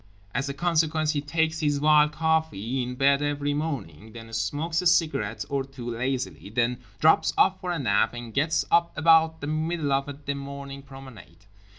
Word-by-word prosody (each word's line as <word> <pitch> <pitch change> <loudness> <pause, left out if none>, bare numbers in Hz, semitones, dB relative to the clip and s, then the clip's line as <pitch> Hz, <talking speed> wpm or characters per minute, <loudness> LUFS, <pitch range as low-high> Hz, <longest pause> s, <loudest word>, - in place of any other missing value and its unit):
As 140 0 -1
a - - -3
consequence 155 -1 +1
he 145 -2 -1
takes 160 +1 -1
his 145 -2 +1
vile 150 +1 +5
coffee 150 -6 -1
in 125 0 -4
bed 140 +2 +3
every 145 0 -1
morning, 120 - -5
then 115 -1 -11
smokes 150 - -1
a 180 - +2
cigarette 155 -11 +1
or 140 -1 -1
two 130 -3 -7
lazily, 115 - -3
then 120 +3 0 0.2
drops - - +4
off - - +3
for 180 - -3
a 175 - -1
nap, 115 -3 +1
and 120 -2 -8
gets 155 +4 +1
up 170 -1 +2
about 160 +1 +4
the - - -4
middle 155 -1 -1
of 135 +1 0 0.2
the 140 - -1
morning 140 0 -7
promenade. 130 -10 -13
140 Hz, 180 wpm, -26 LUFS, 125-155 Hz, 0.2 s, vile